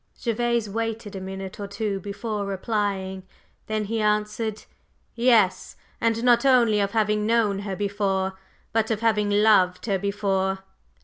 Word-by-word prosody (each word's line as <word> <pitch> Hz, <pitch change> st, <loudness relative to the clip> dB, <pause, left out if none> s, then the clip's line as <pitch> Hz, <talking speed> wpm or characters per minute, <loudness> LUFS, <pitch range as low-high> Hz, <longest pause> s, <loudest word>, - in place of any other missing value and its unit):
Gervase 235 Hz, -1 st, 0 dB
waited 225 Hz, 0 st, -4 dB
a 190 Hz, -, -5 dB
minute 190 Hz, +1 st, -7 dB
or 200 Hz, -, -4 dB
two 200 Hz, 0 st, -3 dB
before 205 Hz, +2 st, -4 dB
replying; 195 Hz, -1 st, -2 dB, 0.5 s
then 215 Hz, -1 st, -1 dB
he 225 Hz, +2 st, -2 dB
answered: 210 Hz, +1 st, -1 dB, 0.5 s
"Yes. 230 Hz, -5 st, +2 dB, 0.3 s
And 230 Hz, 0 st, +1 dB
not 240 Hz, -1 st, +5 dB
only 240 Hz, -6 st, +4 dB
of 200 Hz, -1 st, +1 dB
having 210 Hz, -1 st, +1 dB
known 220 Hz, -4 st, +2 dB
her 200 Hz, -1 st, -4 dB
before, 195 Hz, -1 st, -1 dB, 0.4 s
but 220 Hz, -1 st, +1 dB
of 220 Hz, -1 st, -1 dB
having 210 Hz, -2 st, +2 dB
loved 205 Hz, -3 st, +3 dB
her 200 Hz, -4 st, 0 dB
before. 195 Hz, -1 st, -1 dB
210 Hz, 140 wpm, -24 LUFS, 195-225 Hz, 0.5 s, not